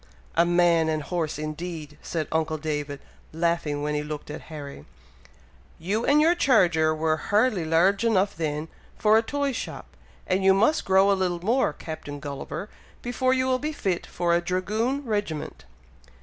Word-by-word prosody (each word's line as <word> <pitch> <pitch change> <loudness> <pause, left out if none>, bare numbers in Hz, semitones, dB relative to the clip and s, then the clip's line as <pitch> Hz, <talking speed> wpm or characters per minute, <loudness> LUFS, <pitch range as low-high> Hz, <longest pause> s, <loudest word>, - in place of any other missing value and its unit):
"A 170 +1 +3
man 175 -2 +3
and 155 -1 -1
horse 165 -3 -2
indeed!" 155 0 -6
said 160 -3 -3
uncle 160 0 0
David, 150 -2 -4 0.3
laughing, 160 -3 -1
when 150 0 -1
he 150 - 0
looked 150 0 -6
at 150 - -7
Harry. 140 - -8 0.9
"You 200 +8 -2
and 290 +1 +5
your 325 +3 +5
charger 170 - +3
were 155 0 +1
hardly 205 +1 +1
large 180 +6 +3
enough 200 -3 +2
then 155 -1 -2 0.3
for 215 0 +4
a 220 - +6
toy 285 +4 -1
shop; 250 - -7 0.3
and 185 +1 0
you 190 0 +6
must 225 +10 +2
grow 190 +1 +4
a - - +5
little 180 -2 -1
more, 240 -4 +2
Captain 145 -2 -7
Gulliver, 145 +5 -6 0.4
before 255 +1 +1
you 260 0 +1
will 255 -1 +1
be 300 +3 -2
fit 190 - -2
for 170 -1 0
a 170 - +3
dragoon 215 +10 -1
regiment." 205 - -3
175 Hz, 165 wpm, -25 LUFS, 155-210 Hz, 0.9 s, a